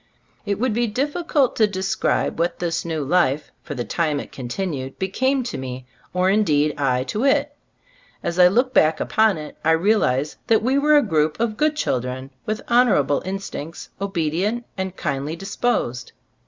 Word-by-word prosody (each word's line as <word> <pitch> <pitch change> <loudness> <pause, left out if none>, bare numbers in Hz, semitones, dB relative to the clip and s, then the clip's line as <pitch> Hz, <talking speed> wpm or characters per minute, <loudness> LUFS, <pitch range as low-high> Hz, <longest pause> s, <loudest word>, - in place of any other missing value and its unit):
It 200 -1 0
would 250 -1 +1
be 240 +2 +1
difficult 285 +3 0
to 215 - +5
describe 190 -4 -1
what 170 +1 0
this 170 -1 -2
new 160 -3 -2
life, 145 -2 +1
for 145 - -7
the 120 -2 -3
time 150 +4 0
it - - -8
con 130 -3 -7
tinued, 135 -3 -4
became 260 +8 0
to 240 - -5
me, 130 -1 -6 0.3
or 180 +1 +2
indeed 155 -8 +2
I 130 -3 +1
to 210 - -3
it. 285 +1 +2 0.7
As 170 +1 -2
I 180 - +9
look 245 +7 +2
back 155 -6 +4
upon 220 -4 +2
it 150 -1 -9
I 160 +1 +4
realize 160 -7 +1
that 220 -2 +3
we 265 +4 +2
were 300 +1 +5
a 290 - +4
group 155 -6 +1
of 225 -2 0
good 305 +5 +1
chil 210 - 0
dren 130 +2 -6 0.2
with 215 0 -2
honorable 235 - +3
instincts, 190 -4 -6
obe 200 0 -4 0.2
dient 210 +9 -1
and 190 -1 -4
kindly 145 -1 -2
disposed. 195 - -2
185 Hz, 180 wpm, -22 LUFS, 150-230 Hz, 0.7 s, I